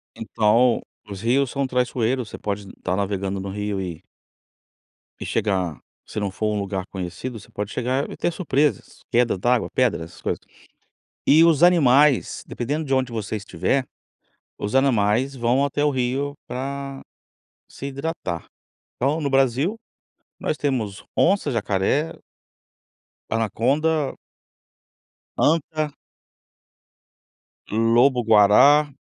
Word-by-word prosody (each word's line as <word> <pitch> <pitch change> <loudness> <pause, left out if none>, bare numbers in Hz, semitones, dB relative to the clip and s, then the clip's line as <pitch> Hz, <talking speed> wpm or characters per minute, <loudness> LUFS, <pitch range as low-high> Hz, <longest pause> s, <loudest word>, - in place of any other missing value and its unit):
Então 115 +2 +2 0.3
os 100 -1 -7
rios 125 +3 +2
são 140 -1 -1
traiçoeiros, 125 -1 0
você - - -8
pode 100 -1 -4
estar 90 - -3
navegando 100 0 -2
no 100 - -5
rio 105 0 -3
e 85 -3 -6 1.2
e - - -5
chegar 95 -7 -1 0.3
se - - -5
não 100 -1 -1
for 105 +3 -2
um 105 - -1
lugar 95 -2 -3
conhecido 95 +6 -6
você 105 - -16
pode 105 +1 -4
chegar 130 +3 -1
e - - -7
ter - - 0
surpresas, 150 -4 -1
queda 120 -3 +2
d'água, 120 +5 +1
pedras, 125 -10 +1
essas - - -16
coisas. - - -2 0.9
E 155 +3 +7
os 165 -2 +4
animais, 150 -5 +4
dependendo 145 +6 -3
de 135 - +1
onde 130 -2 0
você 110 -1 -3
estiver, 130 +5 -1 0.7
os 105 +3 -4
animais 130 0 +2
vão 125 +3 +2
até 145 +1 0
o 150 - +3
rio 135 +2 -1
pra 135 +2 -5 0.7
se 140 - -7
hidratar. 140 - -4 0.5
Então, 140 +6 0
no 145 - -1
Brasil, 135 - +2 0.6
nós - - -1
temos 120 -10 -2
onça, 190 -4 +3
jacaré 115 +7 0 1.2
anaconda 135 +8 0 1.2
anta 155 -1 +1 1.8
lobo-guará, 120 +4 +5
125 Hz, 120 wpm, -23 LUFS, 105-140 Hz, 1.8 s, E